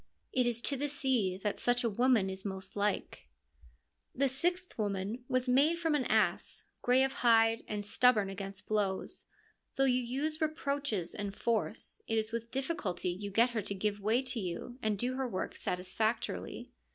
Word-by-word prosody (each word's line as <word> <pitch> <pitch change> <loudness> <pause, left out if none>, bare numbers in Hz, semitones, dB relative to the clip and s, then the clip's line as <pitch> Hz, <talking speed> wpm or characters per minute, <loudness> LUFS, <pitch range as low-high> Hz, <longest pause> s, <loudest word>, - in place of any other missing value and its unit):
It 250 -1 +3
is 235 -1 -1
to 280 - +2
the 290 +2 -1
sea 255 -10 +1
that 210 - -1
such 245 0 +2
a - - +2
woman 235 -2 +3
is 190 0 -5
most 190 -1 -5
like> 205 0 -1 0.9
The 275 +2 +3
sixth 355 +7 -1
woman 205 +3 -2
was 255 -1 +1
made 285 +7 +4
from 325 -2 0
an 280 -4 +1
ass, - - +1 0.2
grey 250 +2 +4
of 270 - 0
hide 225 -1 +4
and 210 -1 -3
stubborn 215 -1 +4
against 195 0 -6
blows. 205 -3 -1 0.5
Though 270 - +2
you 255 -1 +3
use 290 +6 -2
re 315 - +4
proaches 280 - -2
and 205 -1 -4
force, 225 -1 -2
it 225 - +1
is 220 0 0
with 230 0 -4
difficulty 265 - -2
you 195 +3 -4
get 230 +5 +3
her 225 -2 -1
to 200 0 -3
give 205 +1 -1
way 220 +6 +2
to 255 -2 -1
you 195 +7 -5
and 215 -2 +1
do 250 +5 0
her 265 -1 -1
work 185 -6 -3
satisfactorily. 180 - -2
230 Hz, 180 wpm, -32 LUFS, 200-260 Hz, 0.9 s, made